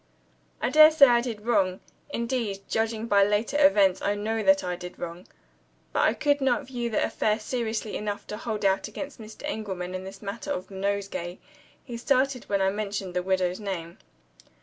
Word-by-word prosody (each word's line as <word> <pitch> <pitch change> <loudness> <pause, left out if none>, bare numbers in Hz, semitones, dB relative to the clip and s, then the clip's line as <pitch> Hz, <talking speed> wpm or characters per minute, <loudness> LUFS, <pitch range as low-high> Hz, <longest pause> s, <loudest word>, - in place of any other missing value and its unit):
I - - +1
dare 310 0 +9
say 310 -3 +7
I 240 -2 +4
did 225 -4 -5
wrong 195 -6 +2 0.3
indeed, 235 -6 -2
judging 225 0 -1
by 200 -3 +4
later 215 +8 +1
events, 200 -10 +5
I 205 - 0
know 215 +2 -2
I 195 -4 +2
did 180 0 -9
wrong. 175 +1 -7 0.7
But - - 0
I - - +1
could 290 -1 +1
not 270 +2 +1
view 245 -2 -3
the 220 - +1
affair 215 0 0
seriously 220 -2 -3
enough 205 -1 -4
to 210 - -4
hold 215 -2 -3
out 195 +2 +2
against 265 +4 -7
Mr. 215 +4 -11
Engelman 190 -9 -4
in 185 0 -4
the 190 +1 -8
matter 200 +3 -6
of 180 - -3
the - - -12
nosegay. 195 -2 -3 0.5
He 240 -3 -6
started 260 0 +1
when 200 -1 0
I 190 - +3
mentioned 200 -2 -4
the 180 - 0
widow's 185 0 0
name. 175 -5 -5
210 Hz, 185 wpm, -26 LUFS, 190-235 Hz, 0.7 s, dare